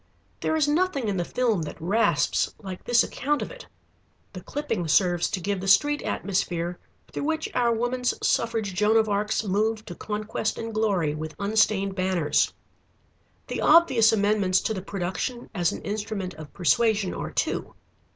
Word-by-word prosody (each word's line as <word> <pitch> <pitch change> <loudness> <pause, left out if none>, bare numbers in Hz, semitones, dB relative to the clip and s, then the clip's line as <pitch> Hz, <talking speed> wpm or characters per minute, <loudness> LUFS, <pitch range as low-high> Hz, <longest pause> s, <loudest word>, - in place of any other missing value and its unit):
There - - 0
is 305 -2 +2
nothing 295 -5 +1
in 200 -2 -1
the 175 - 0
film 230 -2 0
that 155 - -6
rasps 170 -4 +1
like 190 -3 -8
this 240 -1 +4
account 295 +1 -1
of - - -7
it. - - -11 0.7
The - - -7
clipping 225 - -3
serves 175 +1 +3
to 190 - -2
give 195 +1 -2
the 195 - -5
street 290 +9 +4
atmosphere 175 -3 -2 0.3
through - - -4
which 315 +1 -1
our 240 -1 +2
Woman's 245 +2 0
Suffrage 225 -4 0
Joan 210 +4 +3
of 220 -1 +3
Arcs 210 +1 0
move 215 +2 0
to - - -7
conquest 215 +2 -3
and 225 0 -5
glory 200 -8 +1
with 155 +1 -6
unstained 200 -1 +1
banners. 185 -5 +1 0.9
The - - -4
obvious 270 -9 +6
amendments 205 -3 +2
to 220 - -1
the 190 - -4
production 195 +6 -4
as 175 -5 +1
an - - -7
instrument 205 -2 -4
of 155 -1 -11
persuasion 200 - +2
are - - -4
two. - - -2
210 Hz, 165 wpm, -25 LUFS, 185-230 Hz, 0.9 s, obvious